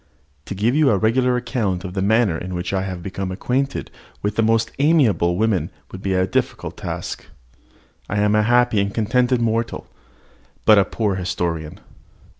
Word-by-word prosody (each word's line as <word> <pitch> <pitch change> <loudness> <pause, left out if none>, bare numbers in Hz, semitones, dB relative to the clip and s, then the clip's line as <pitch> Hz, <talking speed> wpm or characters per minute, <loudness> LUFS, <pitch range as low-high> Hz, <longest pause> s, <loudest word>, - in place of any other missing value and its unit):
To 100 - -5
give 110 +5 +1
you 150 -1 +4
a 105 - +3
regular 125 +4 +2
account 115 -7 -2
of 90 -2 -6
the 95 - -2
manner 105 -2 +3
in 90 +3 -5
which 90 +2 -3
I 95 - +1
have 95 -2 -5
become 95 0 -4
acquainted 130 +8 -2 0.3
with 105 0 -1
the 115 - +2
most 115 0 +2
amiable 140 - +3
of - - -3
women 100 -7 +1 0.2
would 95 - -8
be 95 -1 -1
a 95 0 +2
difficult - - -2
task. - - -5 0.8
I 105 - -1
am 105 0 +2
a 105 - +4
happy 120 -1 +3
and 100 0 -1
contented 120 +3 +1
mortal, 115 0 -1 0.8
but 105 -2 +7
a 100 - +3
poor 100 0 -1
historian. 85 -4 -3
105 Hz, 180 wpm, -21 LUFS, 95-120 Hz, 0.8 s, but